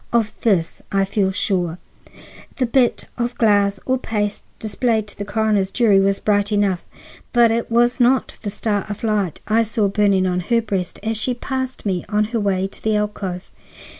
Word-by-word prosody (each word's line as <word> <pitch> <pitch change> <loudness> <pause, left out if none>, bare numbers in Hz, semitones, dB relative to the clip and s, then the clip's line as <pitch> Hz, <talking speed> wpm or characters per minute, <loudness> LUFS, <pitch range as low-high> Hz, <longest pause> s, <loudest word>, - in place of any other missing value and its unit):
Of 225 -2 +1
this 185 -8 +1
I 195 -1 +2
feel 195 -1 0
sure. 180 -3 -1 0.8
The 260 - +1
bit 245 0 +2
of 240 +1 -2
glass 205 -3 +3
or 260 0 +1
paste 210 -4 -2
displayed 220 +1 0
to - - -12
the 205 - -5
coroner's 205 -2 +1
jury 210 -3 +4
was 195 0 +2
bright 205 0 +1
enough, 200 -4 +1 0.5
but 235 -2 +5
it 230 +1 -1
was 240 +2 +2
not 255 +2 +2
the 210 - -3
star 205 0 -1
of 205 - -6
light 210 -6 0
I 225 +1 +3
saw 220 -2 +1
burning 195 -2 +2
on 180 -1 0
her 230 +6 +1
breast 195 -5 -3
as 220 0 -1
she 245 +3 -1
passed 260 0 -4
me 185 -3 -1
on 210 0 +2
her 230 - +1
way 195 -2 0
to 195 - -9
the 220 -1 +1
alcove." 200 -3 -3
210 Hz, 185 wpm, -20 LUFS, 195-230 Hz, 0.8 s, but